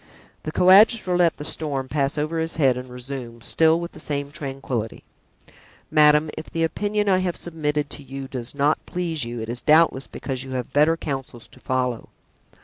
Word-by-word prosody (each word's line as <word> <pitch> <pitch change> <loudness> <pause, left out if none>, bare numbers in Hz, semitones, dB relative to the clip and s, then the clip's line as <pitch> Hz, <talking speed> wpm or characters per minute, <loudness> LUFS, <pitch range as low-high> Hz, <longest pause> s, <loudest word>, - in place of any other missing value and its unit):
The 155 - -5
coadjutor 190 +2 +5
let 175 -2 +3
the 150 - -7
storm 140 -5 -2
pass 140 +1 -1
over 155 +2 -1
his 160 0 -2
head 135 -5 +3
and 125 0 -7
resumed, 125 -2 -7
still 160 0 +3
with 170 0 -5
the - - -12
same 145 -1 -3
tranquillity: 135 -6 -5 0.9
"Madame, 150 0 +5
if - - -8
the 165 - -1
opinion 205 +5 -1
I 185 -2 +4
have 180 -2 -1
submitted 150 -3 -2
to - - -6
you 135 0 -7
does 125 -1 -6
not 145 +2 +1
please 165 -6 -2
you 120 -1 -5
it 110 - -5
is 120 +1 -3
doubtless 155 -3 +4
because 130 -2 -5
you 130 -1 -8
have 125 -2 -4
better 155 +3 +4
counsels 135 -6 -6
to - - -18
follow. 125 -2 -2
150 Hz, 185 wpm, -23 LUFS, 130-165 Hz, 0.9 s, coadjutor